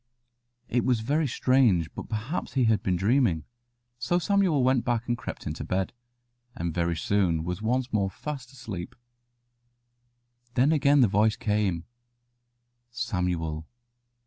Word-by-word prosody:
It 120 Hz, 0 st, +1 dB
was 125 Hz, -4 st, +2 dB
very 145 Hz, +6 st, +1 dB
strange; 115 Hz, -, +2 dB
but -, -, -8 dB
perhaps 115 Hz, +9 st, -3 dB
he 130 Hz, -, +2 dB
had 110 Hz, -4 st, +3 dB
been 95 Hz, -2 st, 0 dB
dreaming, 100 Hz, -, +2 dB, 0.6 s
so 175 Hz, +8 st, +1 dB
Samuel 180 Hz, -6 st, +2 dB
went 130 Hz, -1 st, +3 dB
back 120 Hz, -1 st, -1 dB
and 120 Hz, -, +1 dB
crept 115 Hz, -, -7 dB
into 75 Hz, +2 st, -4 dB
bed, 95 Hz, +3 st, -1 dB, 0.6 s
and 85 Hz, -9 st, -3 dB
very 85 Hz, 0 st, 0 dB
soon 85 Hz, -3 st, +1 dB
was 90 Hz, +3 st, -4 dB
once 125 Hz, +3 st, -1 dB
more 100 Hz, -2 st, +2 dB
fast 135 Hz, +3 st, -7 dB
asleep. 115 Hz, -5 st, -7 dB, 1.6 s
Then 130 Hz, +5 st, +4 dB
again 145 Hz, -2 st, +4 dB
the 120 Hz, -, +6 dB
voice 105 Hz, +2 st, +3 dB
came: 105 Hz, -6 st, 0 dB, 1.1 s
"Samuel." 90 Hz, -9 st, -2 dB
110 Hz, 135 wpm, -27 LUFS, 90-130 Hz, 1.6 s, the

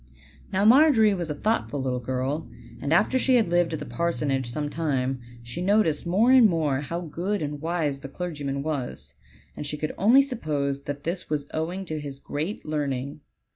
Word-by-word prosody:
Now 195 Hz, +1 st, +2 dB
Margery 235 Hz, -4 st, +6 dB
was 175 Hz, -4 st, -3 dB
a 150 Hz, -, -2 dB
thoughtful 210 Hz, -5 st, -1 dB
little 130 Hz, -1 st, -1 dB
girl; 130 Hz, +5 st, -2 dB, 0.3 s
and 140 Hz, -, -2 dB
after 210 Hz, +9 st, +3 dB
she 260 Hz, 0 st, +3 dB
had 225 Hz, -5 st, +4 dB
lived 175 Hz, -1 st, +2 dB
at -, -, -1 dB
the -, -, -6 dB
parsonage 140 Hz, -7 st, -1 dB
some 150 Hz, +5 st, -2 dB
time, 135 Hz, -5 st, -1 dB, 0.2 s
she 120 Hz, +9 st, -6 dB
noticed 185 Hz, -5 st, +2 dB
more 210 Hz, +8 st, +4 dB
and 250 Hz, -5 st, +7 dB
more 155 Hz, -6 st, +1 dB
how 170 Hz, +4 st, -4 dB
good 180 Hz, +4 st, -2 dB
and 145 Hz, -1 st, -4 dB
wise 160 Hz, -4 st, -1 dB
the 135 Hz, -, -8 dB
clergyman 145 Hz, -5 st, -4 dB
was, 130 Hz, -, -4 dB, 0.4 s
and -, -, -5 dB
she 150 Hz, +1 st, -2 dB
could 155 Hz, +1 st, -3 dB
only 240 Hz, +8 st, +6 dB
suppose 145 Hz, -, -2 dB
that 145 Hz, 0 st, -5 dB
this 175 Hz, +2 st, -4 dB
was 150 Hz, -2 st, -1 dB
owing 175 Hz, +5 st, -3 dB
to 155 Hz, -3 st, -4 dB
his 140 Hz, -2 st, -7 dB
great 155 Hz, +8 st, -4 dB
learning. 140 Hz, -2 st, -3 dB
155 Hz, 185 wpm, -26 LUFS, 140-185 Hz, 0.4 s, and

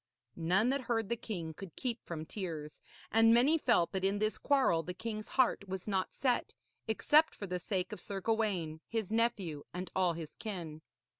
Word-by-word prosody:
None 185 Hz, +8 st, +2 dB
that 275 Hz, +1 st, +1 dB
heard 225 Hz, -4 st, -1 dB
the 235 Hz, -, +1 dB
king 175 Hz, -8 st, -5 dB
could 185 Hz, +1 st, -10 dB
keep 240 Hz, -2 st, -3 dB
from 160 Hz, -2 st, -4 dB
tears; 160 Hz, -6 st, -5 dB, 0.3 s
and 225 Hz, 0 st, +6 dB
many 285 Hz, +7 st, +5 dB
felt 235 Hz, -, +3 dB
that 190 Hz, -1 st, -2 dB
in 195 Hz, +1 st, +2 dB
this 215 Hz, +1 st, 0 dB
quarrel 265 Hz, -, +3 dB
the 180 Hz, +2 st, -6 dB
king's 215 Hz, +1 st, -5 dB
heart 250 Hz, -6 st, +2 dB
was 190 Hz, +1 st, -5 dB
not 190 Hz, -2 st, 0 dB
set, 250 Hz, -3 st, 0 dB, 0.3 s
except 300 Hz, +8 st, +4 dB
for 205 Hz, -, -5 dB
the 180 Hz, -1 st, -3 dB
sake 185 Hz, 0 st, -2 dB
of -, -, -7 dB
Sir 195 Hz, -1 st, -4 dB
Gawaine, 190 Hz, -7 st, 0 dB
his 220 Hz, -3 st, -2 dB
nephew, 200 Hz, -10 st, 0 dB
and 180 Hz, +1 st, -4 dB
all 185 Hz, -2 st, +3 dB
his 160 Hz, -2 st, -7 dB
kin. 170 Hz, -8 st, -5 dB
200 Hz, 190 wpm, -33 LUFS, 175-230 Hz, 0.3 s, and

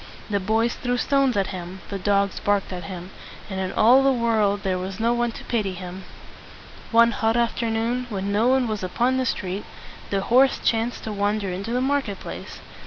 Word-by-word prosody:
The 200 Hz, -, +2 dB
boys 220 Hz, +4 st, +1 dB
threw 245 Hz, 0 st, -2 dB
stones 275 Hz, -2 st, +2 dB
at 195 Hz, -1 st, 0 dB
him, 185 Hz, +1 st, -7 dB
the 200 Hz, -, -3 dB
dogs 200 Hz, 0 st, +1 dB
barked 200 Hz, -2 st, 0 dB
at 180 Hz, -2 st, -6 dB
him, 180 Hz, +1 st, -7 dB, 0.4 s
and 190 Hz, -, -3 dB
in 190 Hz, -1 st, -2 dB
all 245 Hz, +5 st, +6 dB
the 270 Hz, 0 st, +4 dB
world 220 Hz, -5 st, +1 dB
there 185 Hz, -1 st, 0 dB
was 190 Hz, +2 st, -5 dB
no 230 Hz, +1 st, +2 dB
one 240 Hz, 0 st, 0 dB
to -, -, -9 dB
pity 210 Hz, -5 st, -1 dB
him. 180 Hz, +1 st, -8 dB, 0.8 s
One 235 Hz, 0 st, +5 dB
hot 225 Hz, 0 st, +1 dB
afternoon, 235 Hz, +1 st, 0 dB
when 200 Hz, -2 st, -3 dB
no 215 Hz, +4 st, +2 dB
one 260 Hz, -1 st, +3 dB
was 215 Hz, -2 st, -3 dB
upon 240 Hz, +8 st, +1 dB
the 260 Hz, -1 st, 0 dB
street, 190 Hz, -1 st, -2 dB, 0.5 s
the 195 Hz, -1 st, 0 dB
horse 255 Hz, +6 st, +4 dB
chanced 230 Hz, +1 st, 0 dB
to 220 Hz, -, -4 dB
wander 205 Hz, -1 st, 0 dB
into 195 Hz, +5 st, -4 dB
the 250 Hz, +1 st, +1 dB
market 265 Hz, -7 st, 0 dB
place. -, -, -8 dB
215 Hz, 195 wpm, -24 LUFS, 195-240 Hz, 0.8 s, all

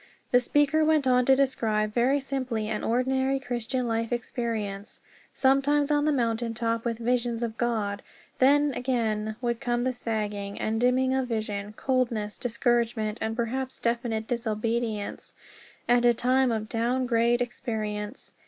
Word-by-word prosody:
The 245 Hz, -, +6 dB
speaker 290 Hz, +4 st, +2 dB
went 310 Hz, -2 st, +3 dB
on 250 Hz, -1 st, +4 dB
to 265 Hz, -, +6 dB
describe 220 Hz, -6 st, 0 dB
very 255 Hz, +5 st, +3 dB
simply 255 Hz, -5 st, -3 dB
an 215 Hz, -1 st, -3 dB
ordinary 265 Hz, +3 st, +1 dB
Christian 245 Hz, -1 st, -2 dB
life 230 Hz, 0 st, -1 dB
experience 225 Hz, -4 st, -3 dB, 0.4 s
sometimes 280 Hz, +2 st, +3 dB
on 290 Hz, 0 st, +2 dB
the 305 Hz, -, +3 dB
mountain 230 Hz, -3 st, 0 dB
top, 230 Hz, 0 st, -1 dB
with 230 Hz, -1 st, -1 dB
visions 240 Hz, 0 st, 0 dB
of 225 Hz, -2 st, -3 dB
God; 220 Hz, -4 st, -1 dB, 0.4 s
then 285 Hz, +2 st, +4 dB
again 220 Hz, -4 st, -1 dB
would 235 Hz, -1 st, -1 dB
come 240 Hz, -2 st, 0 dB
the 255 Hz, 0 st, 0 dB
sagging, 210 Hz, -4 st, -3 dB
and 220 Hz, +1 st, -1 dB
dimming 260 Hz, +1 st, +3 dB
of 265 Hz, -1 st, 0 dB
vision, 215 Hz, -3 st, -3 dB
coldness, 235 Hz, -4 st, -1 dB
discouragement, 235 Hz, -2 st, 0 dB
and 220 Hz, 0 st, -1 dB
perhaps 260 Hz, +3 st, -2 dB
definite 235 Hz, -2 st, -1 dB
disobedience 230 Hz, -2 st, -2 dB, 0.5 s
and 240 Hz, 0 st, +4 dB
a 240 Hz, -1 st, +5 dB
time 255 Hz, +2 st, +2 dB
of 215 Hz, -1 st, -2 dB
down 240 Hz, +3 st, 0 dB
grade 235 Hz, 0 st, +2 dB
experience. 215 Hz, -4 st, -4 dB
240 Hz, 145 wpm, -27 LUFS, 220-255 Hz, 0.5 s, The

